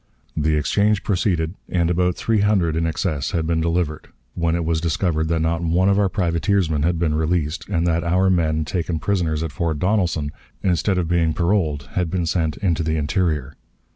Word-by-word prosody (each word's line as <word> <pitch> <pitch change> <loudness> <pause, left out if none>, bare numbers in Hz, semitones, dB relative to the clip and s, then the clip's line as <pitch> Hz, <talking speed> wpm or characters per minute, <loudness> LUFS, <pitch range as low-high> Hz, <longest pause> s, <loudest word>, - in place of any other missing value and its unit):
The 80 0 +1
exchange 100 +7 +1
proceeded, 90 -4 0 0.2
and 85 -1 +1
about 90 +1 +1
three 110 -2 0
hundred 100 -6 +2
in 80 0 0
excess 80 -3 -2
had 80 -2 0
been 80 0 0
delivered, 85 -2 -1 0.3
when 85 0 0
it 85 -1 -1
was 80 -1 0
discovered 80 -1 0
that 80 0 0
not 80 +1 0
one 85 +3 +2
of 100 0 +3
our 100 -2 +2
privateersmen 85 -3 0
had 85 +2 +1
been 80 -2 0
released, 80 +1 -1
and 85 -4 0
that 85 -1 +1
our 90 +3 +2
men 80 -3 +1
taken 85 +2 -2
prisoners 80 -4 -1
at 80 - -4
Fort 80 0 -2
Donelson, 90 -5 0 0.3
instead 95 +1 +1
of 90 -2 0
being 85 -2 +1
paroled, 85 -5 0
had 90 -3 -1
been 90 0 -1
sent 80 -2 -1
into 85 -6 0
the 80 0 0
interior. 75 -3 -1
85 Hz, 190 wpm, -21 LUFS, 80-90 Hz, 0.3 s, of